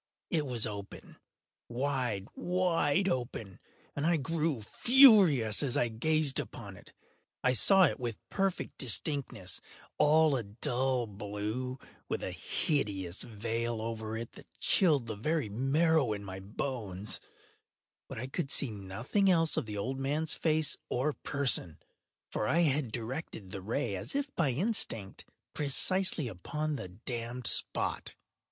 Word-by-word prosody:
It 155 -4 0
was 120 -4 +1
open—wide, 115 +2 -5
wide 180 -1 +1
open—and 120 - -5
I 170 +1 +3
grew 155 -3 -1 0.2
furious 200 - +7
as 135 -4 0
I 120 - +2
gazed 150 +5 +1
upon - - -7
it. - - -16 0.5
I 125 - +3
saw 190 - +5
it 145 - +2
with 120 -3 -3
perfect 195 -2 -2
distinctness—all 145 - +1
a 125 - 0
dull 120 +4 -1
blue, 105 +5 -4 0.3
with - - -2
a - - -3
hideous 100 - -2
veil 115 +1 -3
over 110 0 -4
it 115 0 -6
that - - -15
chilled 150 -10 +4
the 110 -2 -4
very 150 +3 -1
marrow 135 +3 +2
in 100 -1 -6
my 95 -1 -7
bones; 105 -1 -3 0.9
but - - -7
I 120 - -4
could 135 +1 -3
see 135 -3 +1
nothing 110 - -1
else 165 -3 +3
of - - -1
the 105 -1 -5
old 130 +6 -3
man’s 150 +4 +1
face 155 -1 +1
or 140 +5 0
person: 135 - +2 0.5
for 105 - -1
I 170 +9 +3
had 145 -6 +1
directed 115 - -5
the 95 - -5
ray 115 +1 -2
as 95 - -5
if 280 0 -2
by 160 -5 +2
instinct, 125 - -1 0.3
precisely 155 +2 +2
upon 150 - -4
the 135 -10 -5
damned 115 +5 -6
spot. - - 0
130 Hz, 135 wpm, -31 LUFS, 110-155 Hz, 0.9 s, furious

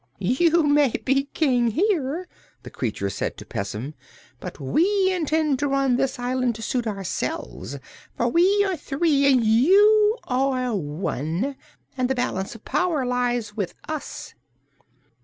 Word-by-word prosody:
"You 315 - +2
may 290 -1 +4 0.2
be 275 +1 +2
King 255 -5 +1
here," 330 - 0 0.4
the - - -10
creature 105 -5 -3
said - - -3
to - - -10
Pessim, 105 +8 -5 0.5
"but - - -8
we 375 - +2
intend 310 -5 0
to 290 - 0
run 275 -2 +2
this 270 +2 0
island 250 -1 -1
to 225 - -8
suit 240 +1 -1
ourselves, 205 - -4 0.4
for - - +1
we 390 +4 +3
are 380 -2 -1
three 280 -2 +2
and 255 -3 +3
you 415 - +5
are 255 -2 0
one, 165 - -3 0.4
and 255 -1 0
the 265 - +1
balance 195 -5 -2
of 225 - -14
power 300 -2 0
lies 245 -3 -1
with 200 -5 -3
us." 310 -2 -6
265 Hz, 140 wpm, -23 LUFS, 230-320 Hz, 0.5 s, you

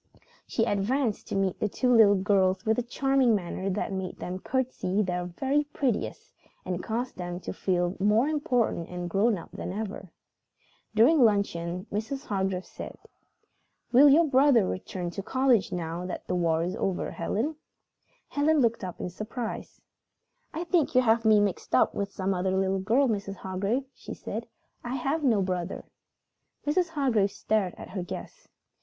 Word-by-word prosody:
She 225 - +1
advanced 220 +3 0
to - - -4
meet 195 -2 0
the 210 - 0
two 250 +4 +1
little 210 -3 +7
girls 190 -1 +2
with 220 +2 +2
a - - +2
charming 260 0 +2
manner 190 0 -3
that 195 +1 -2
made 190 -1 -4
them 185 +1 -5
curtsey 225 -5 -1
their 180 -1 -2
very 270 +12 0
prettiest 275 -6 -2 0.3
and 180 -1 -2
caused 240 +3 -3
them 175 -1 -4
to - - -5
feel 180 -1 0
more 210 +6 +3
important 250 - 0
and 180 0 -4
grown 200 +5 +2
up 165 - -11
than - - -5
ever. 200 -2 -5 0.9
During 255 +6 +6
luncheon 185 -4 +1
Mrs. 265 +7 -3
Hargrave 190 -2 -1
said: - - -9 0.9
"Will 275 +4 +8
your 320 +4 +6
brother 270 -6 +4
return 180 -1 -4
to 195 - -5
college 255 -1 +2
now 170 +1 -3
that 185 - -6
the - - -3
war 165 -2 +1
is 180 +2 -2
over, 190 -2 -1
Helen?" 230 - -2 0.7
Helen 305 +2 +2
looked 235 -4 +1
up 180 -1 -6
in 180 - -4
surprise. 220 +4 -6 0.7
"I 330 - -3
think 335 -6 +1
you 255 - +7
have 230 -1 +2
me 215 -1 +6
mixed 205 -3 -1
up - - +4
with 200 -1 -3
some 195 0 -1
other 190 +1 0
little 190 0 +1
girl, 235 +8 +3
Mrs. 200 -3 -2
Hargrave," 195 +8 -2
she - - -9
said. - - -6 0.4
"I 245 +2 -3
have 275 +4 -1
no 225 -7 +3
brother." 180 -1 -3 0.8
Mrs. 340 +4 +1
Hargrave 255 -10 +1
stared 200 -3 -1
at - - -10
her 185 -1 -3
guest. 175 - -8
205 Hz, 165 wpm, -28 LUFS, 185-255 Hz, 0.9 s, Will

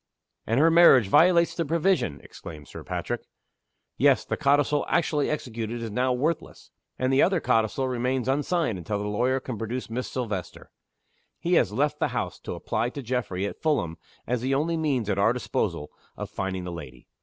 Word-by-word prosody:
"And 115 +4 +2
her 165 +2 +5
marriage 150 - +7
violates 170 - +5
the 170 - -1
provision!" 165 - 0
exclaimed 75 -3 -11
Sir - - -9
Patrick. - - -3 0.8
"Yes. - - +4
The - - -2
codicil 145 0 +2
actually 150 -4 +1
executed 120 -5 -4
is 115 - -5
now 125 +4 +1
worthless. 150 +6 -2 0.3
And 130 +1 0
the 135 - +5
other 185 -1 +3
codicil 115 +1 +1
remains 125 0 -1
unsigned 145 - 0
until 95 +5 -3
the 105 0 -3
lawyer 125 +6 +1
can 125 -5 -6
produce 115 +2 -4
Miss 125 +2 -3
Silvester. 105 -9 -5 0.7
He 175 - -1
has 115 - +4
left 140 +7 0
the - - +2
house - - -3
to - - -6
apply 120 - -1
to 140 +2 -7
Geoffrey 115 -6 -2
at 100 - -6
Fulham, 85 - 0 0.3
as 125 -1 -1
the 135 +2 0
only 160 +4 0
means 140 -9 0
at 100 -1 0
our 110 +4 +4
disposal 95 -10 -2 0.3
of - - -6
finding 95 -1 -3
the 90 - -5
lady. 70 -8 -9
125 Hz, 180 wpm, -26 LUFS, 105-145 Hz, 0.8 s, marriage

